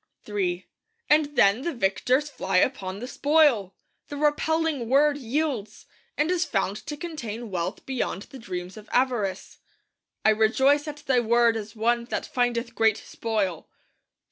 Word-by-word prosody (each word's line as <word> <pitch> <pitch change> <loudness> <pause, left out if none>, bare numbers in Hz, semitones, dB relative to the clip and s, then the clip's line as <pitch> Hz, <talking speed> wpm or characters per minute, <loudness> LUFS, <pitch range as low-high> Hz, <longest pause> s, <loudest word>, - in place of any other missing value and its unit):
III 190 -4 -2 0.5
And 300 -1 +3
then 200 +2 +4
the 335 +1 -3
victors 250 +7 +1
fly 190 -10 -1
upon 190 -3 0
the 245 +4 -6
spoil! 280 - +3 0.3
The 290 - -6
repelling 300 -3 0
Word 285 +2 +4
yields, 255 -4 -3 0.3
and 305 +4 +1
is 360 -1 +2
found 195 - -1
to 295 - -4
contain 240 - -6
wealth 170 -2 -3
beyond 250 -6 -3
the 265 - -12
dreams 180 -3 -6
of 215 0 -12
avarice. 245 -7 -1 0.7
'I - - +7
rejoice 265 +7 +3
at 295 0 -7
Thy 260 -2 +3
Word 235 0 +3
as 215 -1 -6
one 235 +2 +1
that - - -3
findeth 240 -1 -1
great 225 -1 +3
spoil.' 210 -9 -3
240 Hz, 145 wpm, -26 LUFS, 205-290 Hz, 0.7 s, I